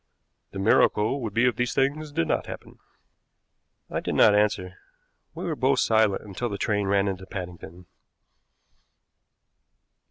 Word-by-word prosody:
The -, -, -9 dB
miracle 105 Hz, +5 st, +2 dB
would 110 Hz, -4 st, -5 dB
be 120 Hz, +2 st, +3 dB
if 125 Hz, -3 st, +1 dB
these 125 Hz, -1 st, -1 dB
things 145 Hz, +3 st, 0 dB
did 80 Hz, -, -1 dB
not -, -, -1 dB
happen." -, -, -10 dB, 1.1 s
I -, -, -3 dB
did -, -, -3 dB
not 105 Hz, -, +6 dB
answer. 105 Hz, -3 st, 0 dB, 0.6 s
We -, -, -6 dB
were 165 Hz, -3 st, -2 dB
both 135 Hz, 0 st, +2 dB
silent 110 Hz, -4 st, +2 dB
until 105 Hz, +4 st, -4 dB
the 100 Hz, -, -4 dB
train 105 Hz, -1 st, -1 dB
ran 100 Hz, 0 st, +2 dB
into 95 Hz, -1 st, -4 dB
Paddington. 90 Hz, -1 st, -8 dB
105 Hz, 145 wpm, -25 LUFS, 95-125 Hz, 1.1 s, not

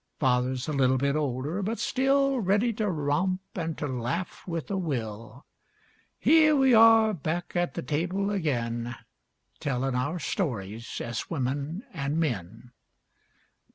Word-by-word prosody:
Father's 130 Hz, 0 st, +1 dB
a 155 Hz, -, -2 dB
little 130 Hz, -2 st, +3 dB
bit 140 Hz, +2 st, +1 dB
older, 145 Hz, +5 st, -1 dB
but 220 Hz, +4 st, -2 dB
still 275 Hz, 0 st, +2 dB
Ready 210 Hz, +3 st, +2 dB
to 215 Hz, -1 st, -1 dB
romp 180 Hz, +4 st, 0 dB
an' 165 Hz, -3 st, -3 dB
to -, -, -4 dB
laugh 130 Hz, +8 st, -3 dB
with 165 Hz, +1 st, -4 dB
a -, -, 0 dB
will. 115 Hz, -, -4 dB, 0.7 s
Here 310 Hz, -1 st, +5 dB
we 265 Hz, -2 st, +4 dB
are 225 Hz, -1 st, +7 dB
back 170 Hz, +1 st, -3 dB
at 175 Hz, -6 st, 0 dB
the -, -, -3 dB
table 180 Hz, +9 st, -1 dB
again 120 Hz, -, -2 dB, 0.6 s
Tellin' 135 Hz, -1 st, -1 dB
our 145 Hz, +7 st, -1 dB
stories 115 Hz, -, -3 dB
as 120 Hz, 0 st, -4 dB
women 145 Hz, -, -2 dB
an 145 Hz, -2 st, -2 dB
men. 115 Hz, -, -3 dB
150 Hz, 135 wpm, -27 LUFS, 125-195 Hz, 0.7 s, are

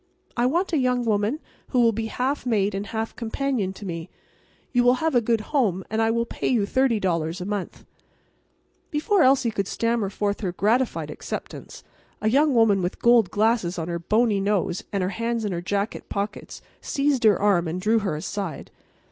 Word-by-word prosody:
I 240 Hz, 0 st, +2 dB
want 345 Hz, +7 st, 0 dB
a 310 Hz, -, +3 dB
young 250 Hz, -1 st, +1 dB
woman 215 Hz, +6 st, +1 dB, 0.3 s
who 255 Hz, -, 0 dB
will 230 Hz, -1 st, +5 dB
be 225 Hz, +1 st, -3 dB
half 260 Hz, +5 st, -2 dB
maid 210 Hz, -5 st, +1 dB
and 200 Hz, +1 st, -4 dB
half 225 Hz, +1 st, -4 dB
companion 235 Hz, -3 st, -2 dB
to 200 Hz, -, -10 dB
me. 165 Hz, -1 st, -5 dB, 0.6 s
You 245 Hz, -1 st, +3 dB
will 245 Hz, +1 st, +5 dB
have 320 Hz, +4 st, -1 dB
a 245 Hz, -, +4 dB
good 230 Hz, -1 st, +1 dB
home 200 Hz, -, +1 dB
and 220 Hz, +1 st, +1 dB
I 225 Hz, -, +3 dB
will 235 Hz, +1 st, +1 dB
pay -, -, -4 dB
you 235 Hz, -5 st, +2 dB
$30 190 Hz, -10 st, 0 dB
a 180 Hz, -, -5 dB
month." 205 Hz, -2 st, -5 dB, 1.0 s
Before 335 Hz, +6 st, +1 dB
Elsie 260 Hz, -3 st, +4 dB
could 200 Hz, -2 st, -2 dB
stammer 230 Hz, -3 st, 0 dB
forth 205 Hz, 0 st, -2 dB
her 185 Hz, -4 st, -2 dB
gratified 230 Hz, +7 st, 0 dB
acceptance, -, -, -7 dB, 0.4 s
a 215 Hz, -, +1 dB
young 285 Hz, +1 st, +3 dB
woman 215 Hz, -4 st, +4 dB
with 175 Hz, +1 st, -2 dB
gold 235 Hz, -5 st, +4 dB
glasses 215 Hz, -4 st, +1 dB
on 165 Hz, 0 st, -3 dB
her 170 Hz, 0 st, -2 dB
bony 215 Hz, +4 st, +2 dB
nose 195 Hz, -3 st, 0 dB
and 195 Hz, -2 st, -1 dB
her 180 Hz, -, 0 dB
hands 230 Hz, +2 st, -2 dB
in 205 Hz, -, -1 dB
her 170 Hz, -1 st, -3 dB
jacket 200 Hz, +4 st, -3 dB
pockets 205 Hz, +1 st, -5 dB, 0.2 s
seized 280 Hz, -3 st, 0 dB
her 210 Hz, -4 st, +5 dB
arm 195 Hz, -4 st, +2 dB
and 165 Hz, +3 st, -3 dB
drew 220 Hz, +4 st, +2 dB
her 195 Hz, -7 st, -2 dB
aside. 190 Hz, +3 st, -5 dB
220 Hz, 190 wpm, -24 LUFS, 195-245 Hz, 1.0 s, will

